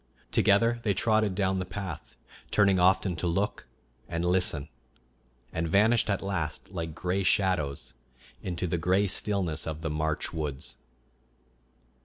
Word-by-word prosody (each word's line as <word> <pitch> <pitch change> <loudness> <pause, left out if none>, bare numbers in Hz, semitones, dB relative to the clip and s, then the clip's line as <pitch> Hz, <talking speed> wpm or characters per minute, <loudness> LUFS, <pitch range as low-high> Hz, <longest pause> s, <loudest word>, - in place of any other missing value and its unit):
Together 115 +4 +3
they 105 -4 0
trotted 110 -1 +2
down 95 -1 +1
the - - -1
path, 95 -4 -7 0.3
turning 100 -3 +4
often 95 0 +3
to 85 - -2
look 95 -1 -1 0.4
and 85 0 -2
listen, 90 -5 +1 0.9
and 80 0 -1
vanished 110 +7 +3
at 100 -1 0
last, 90 -4 -3
like 80 -4 -5
gray 90 +2 -1
shadows, 75 - +1 0.5
into 90 -1 -3
the 85 0 -1
gray 95 +4 +2
stillness 95 -5 0
of 80 0 -4
the 80 -2 -2
March 75 0 -1
woods. 75 -4 -1
90 Hz, 135 wpm, -28 LUFS, 80-100 Hz, 0.9 s, turning